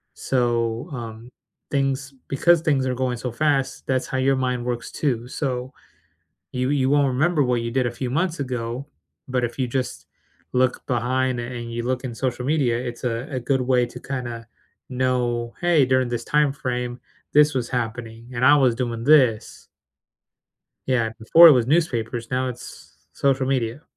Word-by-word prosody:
So, 120 0 0
um, 115 -1 -7 0.4
things 135 0 -1
because 170 +5 +4
things 135 -5 +1
are 130 - 0
going 125 -1 -1
so 125 +1 -4
fast, 140 0 0
that's 130 -1 0
how 130 - -3
your 135 +1 +2
mind 125 -2 -1
works 120 -1 -3
too, 125 -5 -2
so 130 -2 -3 0.8
you 125 +1 -1
you 135 -2 +2
won't 145 0 +3
remember 145 +4 +2
what 125 -2 +1
you 115 - -3
did 125 0 +1
a - - -3
few 125 +1 -4
months 165 +5 -1
ago, 125 0 -4 0.4
but 125 -1 -1
if 120 - -3
you 130 - +1
just 125 0 -3 0.5
look 125 0 +1
behind, 125 +1 0
and 120 -1 -6
you 120 - -3
look 125 +1 -2
in 120 - -4
social 125 0 -2
media, 135 -5 +1
it's 120 -1 -6
a 120 +1 -2
a 130 - -2
good 130 +1 0
way 125 -1 +2
to - - -10
kinda 120 -4 -5 0.4
know, 125 -2 -1
"Hey, 170 -5 +4
during 130 -1 +2
this 120 -1 -3
timeframe, 125 -4 -1 0.3
this 150 +1 +5
was 120 -2 -1
happening 115 -1 -4
and 125 +1 +1
I 145 +3 +8
was 130 -5 +3
doing 120 -2 -3
this." 125 -6 +3 1.2
Yeah, 120 -4 +1
before 165 +9 +8
it - - +8
was 125 -4 +2
newspapers, 120 -7 0
now 130 0 0
it's 120 -9 -10 0.2
social 135 +5 +1
media. 130 0 -1
125 Hz, 170 wpm, -23 LUFS, 120-135 Hz, 1.2 s, I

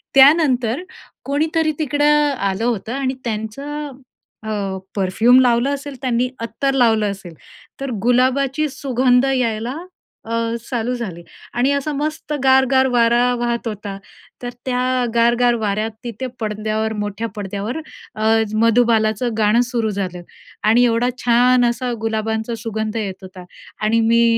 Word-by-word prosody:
त्यानंतर 270 -2 +5 0.4
कोणीतरी 315 +3 +1
तिकडं 290 -1 0 0.3
आलं 200 +2 -1
होतं 230 -1 -2
आणि 265 -1 -1
त्यांचं 275 +7 -4 0.6
अ, 200 -3 -2 0.2
परफ्यूम 215 +6 +4
लावलं 245 +1 +3
असेल, 280 0 -8
त्यांनी 250 -1 0
अत्तर 270 +4 -2
लावलं 220 -5 +3
असेल, 195 -3 -9 0.5
तर 275 - -3
गुलाबाची 260 +4 +2
सुगंध 255 -1 +2
यायला 235 0 -1 0.5
अ, 230 +1 -3 0.3
चालू 240 -1 -1
झाली 190 -8 -6 0.3
आणि 250 +3 +2
असा 280 +2 -1
मस्त 300 +1 -3
गार-गार 265 0 +4
वारा 235 0 +4 0.2
वाहत 235 0 -1
होता, 205 -2 -5 0.5
तर 245 - -3 0.2
त्या 250 -1 0 0.3
गार-गार 240 +1 +3
वाऱ्यात 215 +2 -1
तिथे 245 +2 -5
पडद्यावर 215 0 -2
मोठ्या 205 +2 -3
पडद्यावर 205 +5 -4 0.4
अ, 215 - -2 0.3
मधुबालाचं 230 0 +2
गाणं 215 +2 +4
सुरू 230 -3 0
झालं 185 -3 -4 0.4
आणि 230 +3 +5
एवढा 235 +1 +2 0.2
छान 245 +1 +4
असा 245 +1 -2
गुलाबांचा 220 +1 -2
सुगंध 220 0 -3
येत 195 -4 -4
होता 185 -1 -11 0.4
आणि 225 +2 +3
मी 230 0 +5
235 Hz, 130 wpm, -19 LUFS, 215-260 Hz, 0.6 s, त्यानंतर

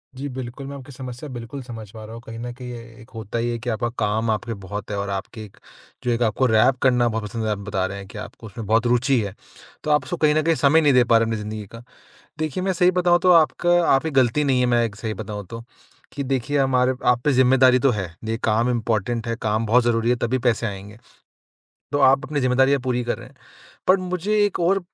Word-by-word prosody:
जी, 135 +2 -5
बिल्कुल, 130 +1 -7
मैं 140 - -7
आपकी 135 +1 -11
समस्या 130 +1 -8
बिल्कुल 125 +2 -7
समझ 115 -4 -9
पा 110 0 -10
रहा 110 - -10
हूँ। 115 - -9
कहीं 115 0 -8
न 120 +1 -5
कहीं 125 0 -8
एक 115 -1 -12
होता 110 0 -5
ही 120 +1 -1
है 120 - -2
कि 120 +1 -4
आपका 120 +1 -1
काम 110 +2 0
आपके 115 +2 -2
बहुत 105 +3 -6
है 100 - -2
और 100 0 -3
आपके 100 +3 -5
एक 100 - -18 0.5
जो 120 - 0
एक 115 +1 -1
आपको 120 +4 +1
रैप 120 +3 +4
करना 125 -2 +3
बहुत 110 -1 -2
पसंद 115 +2 -4
है, - - 0
आप 105 - -1
बता 100 -2 -2
रहे 100 +1 -5
हैं 95 -1 -9
कि - - -11
आपको 115 - -9
उसमें 110 +2 -8
बहुत 115 +3 +2
रूचि 125 +1 +2
है। 100 -2 -5 0.5
तो 155 - -1
आप 150 - +3
उसको 175 - -4
कहीं 150 -1 +3
न 155 - +3
कहीं 165 +1 +2
समय 150 +3 +4
नहीं 145 -3 +4
दे 125 - +6
पा 115 -1 +4
रहे 115 - +2
हैं 115 - -3
अपनी 105 - -3
ज़िंदगी 105 0 -6
का। 115 +1 -11 0.6
देखिए 155 +3 -2
मैं 190 - +1
सही 180 +1 +3
बताऊँ 175 -1 +3
तो 185 - +5
आपका 175 +2 +4
आपकी 160 +4 +1
गलती 135 +2 +2
नहीं 130 -2 +2
है, 125 - +3
मैं 120 -1 +3
एक 100 -3 -4
सही 110 0 -4
बताऊँ 105 -1 -6
तो। 115 0 -7 0.5
कि 140 - -4
देखिए 135 +2 -1
हमारे 130 -1 +2
आप 120 -1 +4
पे 145 - +3
ज़िम्मेदारी 130 0 +5
तो 135 +1 +3
है, 95 -7 -4
ये 110 +1 -2
काम 115 +3 +2
इम्पोर्टेंट 115 0 -1
है, 115 - 0
काम 110 0 0
बहुत 120 +3 +4
ज़रूरी 115 0 +1
है 125 - +3
तभी 120 +2 -1
पैसे 115 0 0
आएँगे। 100 +1 -8 0.9
तो 145 - 0
आप 135 +1 +4
अपनी 150 -1 -2
जिम्मेदारियाँ 130 +2 +3
पूरी 125 -1 -1
कर 120 - -2
रहे 125 +1 -11
हैं। 135 - -21 0.5
पर 185 +1 +6
मुझे 180 +3 -2
एक 200 - -3
और 185 +3 +2
120 Hz, 255 wpm, -22 LUFS, 110-135 Hz, 0.9 s, दे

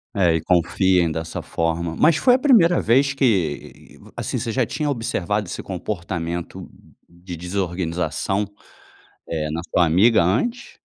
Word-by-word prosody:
É, 85 -4 +3
e 80 - -1
confiem 90 0 +2
dessa 80 +1 -5
forma. 85 0 -2
Mas 155 0 +4
foi 250 +6 +4
a 255 - 0
primeira 205 - +4
vez 135 +5 +2
que, 95 - -1 0.2
assim, - - -3
você 115 - -3
já 125 +3 +1
tinha 150 +6 -3
observado 105 -6 -2
esse - - -6
comportamento 85 -2 -5 0.4
de 85 +1 -10
desorganização, 90 +2 -2 0.8
eh, 75 -2 -2
na 80 +2 -3
sua 90 - +4
amiga 95 +8 +4
antes? 125 - -1
90 Hz, 135 wpm, -21 LUFS, 85-115 Hz, 0.8 s, Mas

